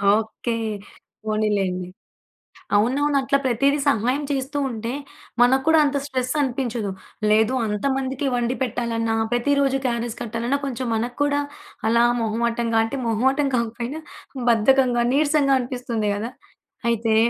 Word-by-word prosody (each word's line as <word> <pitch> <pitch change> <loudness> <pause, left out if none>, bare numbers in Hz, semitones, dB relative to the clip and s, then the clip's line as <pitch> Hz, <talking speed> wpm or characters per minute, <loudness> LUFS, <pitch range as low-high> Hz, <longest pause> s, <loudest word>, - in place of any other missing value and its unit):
Okay. 220 +2 -2 0.7
పోనిలేండి. 200 -4 0 0.9
అవునవును. 280 +7 +2
అట్లా 275 +1 +2
ప్రతీది 275 +4 +2
సహాయం 255 +3 +2
చేస్తూ 275 +1 -2
ఉంటే, 230 +1 -4 0.5
మనకు 265 +2 +4
కూడా 320 -1 +6
అంత 280 0 0
స్ట్రెస్సనిపించదు. 255 -5 -1 0.4
లేదు, 220 +4 +4
అంత 210 -1 -3
మందికి 270 +1 -2
వండి 240 +1 0
పెట్టాలన్నా, 230 -2 -1 0.2
ప్రతి 245 +4 +2
రోజు 270 -1 +2
క్యారేజ్ 235 -1 -1
కట్టాలన్నా, 235 +4 -1
కొంచం 255 -2 -3
మనకు 240 +2 -3
కూడా 290 0 +1 0.5
అలా 235 +1 +4 0.2
మొహమాటం‌గా, 230 +1 0
అంటే, 250 +5 -4
మొహమాటం 265 +5 +2
కాకపోయినా 235 +6 -3 0.5
బద్ధకంగా, 245 +1 +3
నీరసంగా 285 -2 +3
అనిపిస్తుంది 240 -4 -2
గదా! 225 +4 -4 0.6
అయితే 225 -1 +1
240 Hz, 120 wpm, -23 LUFS, 225-270 Hz, 0.9 s, కూడా